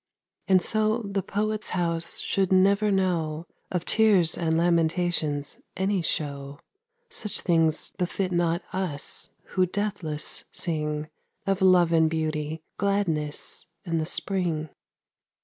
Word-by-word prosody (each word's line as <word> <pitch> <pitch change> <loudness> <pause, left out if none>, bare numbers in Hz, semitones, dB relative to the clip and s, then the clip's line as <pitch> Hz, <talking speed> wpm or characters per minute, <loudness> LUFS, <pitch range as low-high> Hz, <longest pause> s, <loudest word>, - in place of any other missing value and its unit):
And 185 -2 +4
so 215 +1 +1
the 200 -1 -2
poet's 215 +3 -2
house 170 -1 0
should 195 -2 0
never 200 +3 +4
know 170 -5 0 0.2
Of 180 -2 -2
tears 205 -7 +4
and 160 -1 0
lamentations 165 -3 +1 0.2
any 190 0 +1
show; 140 -3 -3 0.5
Such 215 - -1
things 165 -3 +2
befit 185 +1 -1
not 175 0 +1
us 175 -7 -3 0.2
who 185 -1 +3
deathless 185 -6 -3
sing 150 -2 -2 0.4
Of 195 0 0
love 180 -3 +5
and 160 -1 +4
beauty, 155 -1 -2 0.2
gladness 175 -7 0 0.2
and 165 -2 0
the 155 - -2
spring. 170 -5 -1
175 Hz, 115 wpm, -26 LUFS, 160-195 Hz, 0.5 s, love